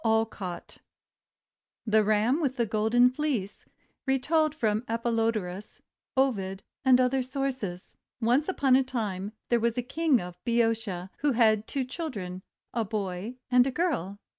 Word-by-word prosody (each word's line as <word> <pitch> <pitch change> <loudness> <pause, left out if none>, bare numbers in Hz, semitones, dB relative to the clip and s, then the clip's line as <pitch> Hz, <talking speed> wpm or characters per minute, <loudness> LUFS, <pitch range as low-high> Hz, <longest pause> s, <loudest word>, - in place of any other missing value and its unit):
CANFIELD 225 0 +3
(adapted) 180 -4 -7 1.0
THE 215 -1 +4
RAM 215 +8 +2
WITH 270 -4 0
THE 240 -3 +1
GOLDEN 225 +4 +3
FLEECE 255 -8 -2 0.4
Retold 305 +4 +2
from 220 -5 0
Apollodorus, 225 -4 -1 0.4
Ovid, 195 -8 0 0.2
and 260 -2 +6
Other 255 +1 +2
Sources 255 -8 -4 0.2
ONCE 250 +8 +2
upon 275 -8 +3
a 265 - +4
time, 210 -6 -3 0.2
there 240 - +3
was 235 +1 0
a 245 - 0
King 300 +1 +2
of 180 -1 -9
Boeotia 225 -6 0
who 290 -1 +2
had 220 -2 +3
two 275 - -1
children, 215 - -5 0.3
a 230 - 0
boy 200 +1 -4 0.2
and 250 +1 +5
a - - 0
girl. 255 - -1
230 Hz, 140 wpm, -28 LUFS, 210-260 Hz, 1.0 s, and